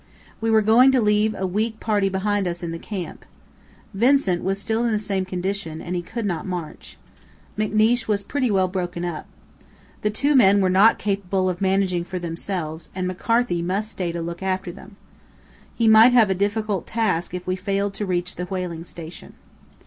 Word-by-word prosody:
We 225 - 0
were 220 -1 +4
going 240 +5 +6
to 260 - +4
leave 210 0 +2
a 190 - -2
weak 215 +4 -2
party 205 -3 +1
behind 195 0 0
us 175 0 -4
in 170 - -3
the 165 - -5
camp. 190 -3 -6 0.7
Vincent 230 -4 +2
was 195 +1 -1
still 220 +3 -1
in 235 - +1
the 215 - +1
same 195 -3 -2
condition, 185 -3 -4
and 175 +2 -5
he 175 - -1
could 225 +5 -5
not 180 -1 -2
march. 175 -4 -6 0.6
McNeish 215 +2 +2
was 205 -2 0
pretty 255 +4 -1
well 190 -2 +2
broken 180 -1 -3
up. 170 -3 -5 0.7
The 210 - +1
two 280 +7 +1
men 200 -5 +6
were 185 -2 +2
not 200 +5 +5
capable 195 -2 -1
of 180 0 -4
managing 190 -2 +1
for 180 +1 -6
themselves 170 -1 -4
and 185 -1 -2
McCarthy 230 0 0
must 195 +5 -2
stay 180 -5 -3
to 170 0 -4
look 170 +1 -6
after 190 -1 -2
them. 200 +4 -14 0.8
He 230 - +1
might 220 +3 +7
have 225 -5 +5
a - - +4
difficult 205 +1 -1
task 185 -6 -1
if 180 - -6
we 185 - -1
failed 195 +1 -2
to 205 +1 -3
reach 180 -1 -2
the 180 - -3
whaling 180 -3 -4
station. 165 -1 -10
195 Hz, 190 wpm, -23 LUFS, 180-215 Hz, 0.8 s, might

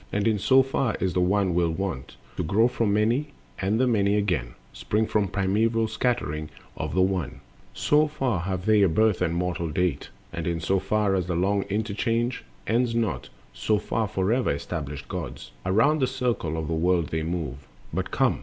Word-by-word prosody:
And 100 +2 0
in 110 -2 +2
so 130 +6 +5
far 135 -3 0
as - - -8
is - - -6
the 90 - +1
One 95 0 +2
still 85 -1 +2
wont 90 -7 -4 0.2
To - - 0
grow 110 +9 +3
from 115 -4 0
Many, 120 +8 +1 0.3
and 100 +4 +1
the 130 - +4
Many, 105 -4 +2
again, 90 -13 -1 0.2
Spring 110 +1 0
from 105 -2 +1
primeval 110 +4 +1
scattering 110 - -1 0.3
of - - -4
the 95 - +4
One, 95 -5 -2 0.3
So 150 +1 +3
far 135 - -1
have 95 +1 -3
they 110 -1 +5
a 100 - +5
birth 110 +3 +2
and 85 -2 +1
mortal 85 -1 -1
date; 85 -2 -1 0.2
And 85 -1 -3
in 85 -1 -1
so 95 +4 +1
far 100 +1 +1
as 90 -2 0
the 90 - -1
long 100 +3 +1
interchange 115 +4 -1 0.2
Ends 115 +1 +1
not, 110 -8 -1 0.2
so 110 - +1
far 105 +1 -1
forever 105 +5 +1
established 70 0 -4
gods - - -6 0.2
Around 125 +11 +3
the 130 - +3
circle 125 -11 -1
of 80 -1 -3
the 85 - -2
world 85 0 +1
they 80 - -1
move. 80 -5 -4 0.3
But - - -2
come! - - +1
100 Hz, 190 wpm, -26 LUFS, 85-115 Hz, 0.3 s, so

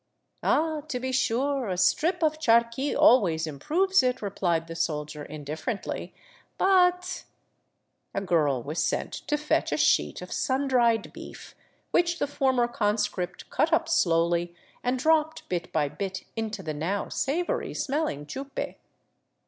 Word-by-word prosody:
" - - -50
'* - - -39
Ah, 315 -1 +1
to 260 -5 -3
be 260 +1 -3
sure, 260 0 0
a 180 - -2
strip 315 - +2
of 310 0 +1
charqui 235 +1 +2
always 200 - +5
improves 325 - +2
it," 255 -1 0
replied 175 -5 -1
the 165 0 -8
soldier 150 -2 -3
indifferently, 155 - -5 0.2
" - - -31
but.. 365 -1 +2 0.4
." - - -50
A 195 - 0
girl 150 -9 +1
was 150 +6 -2
sent - - -1
to 295 - -2
fetch 300 0 0
a - - 0
sheet - - +2
of - - -10
sun 270 +1 0
dried 235 -4 +2
beef, - - -10 0.4
which 345 0 +2
the - - 0
former 265 -4 +1
conscript 210 -5 -2
cut 320 - +1
up 330 0 +2
slowly 170 - +2 0.3
and 250 +1 +1
dropped 315 +3 +1
bit 175 -2 -3
by 150 -2 +1
bit 185 +7 -5
into 220 -3 -4
the 155 -2 -3
now 170 +7 -2
savory 350 - -2
smelling 275 - -2
chupe. 270 - -5
235 Hz, 155 wpm, -27 LUFS, -, 0.4 s, always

